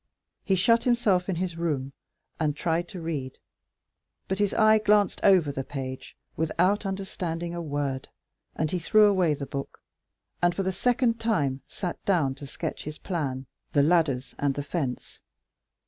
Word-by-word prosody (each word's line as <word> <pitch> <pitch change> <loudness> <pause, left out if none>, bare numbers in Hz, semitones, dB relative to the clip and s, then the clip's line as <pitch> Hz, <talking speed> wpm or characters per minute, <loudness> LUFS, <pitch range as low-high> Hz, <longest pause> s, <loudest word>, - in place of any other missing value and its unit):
He 195 - +2
shut 230 +5 +4
himself 220 -7 +2
in 185 - 0
his 175 -1 -3
room, 140 -5 -2 0.5
and 150 -3 +1
tried 170 +1 0
to 180 - -8
read, 150 -6 -4 0.9
but 190 +1 -2
his 205 -1 +2
eye 215 -1 +6
glanced 210 -1 +3
over 180 -7 +5
the 135 -1 -4
page 130 -1 -6 0.2
without 180 +6 +1
understanding 175 -3 -4
a 170 - -4
word, 145 -4 -3 0.5
and 155 -1 -1
he 180 - 0
threw 215 +6 +5
away 185 -7 +3
the 140 - -5
book, 140 0 -6 0.6
and 175 0 +3
for 195 - -1
the 190 - 0
second 235 +3 +1
time 145 - 0
sat 180 -3 -5
down 165 -9 +2
to 140 +1 -9
sketch - - -5
his 150 0 -6
plan, 140 -8 -3 0.3
the 145 - +4
ladders 145 -5 +2
and 140 -1 +1
the 145 - -3
fence. 140 -5 -4
170 Hz, 165 wpm, -27 LUFS, 145-195 Hz, 0.9 s, eye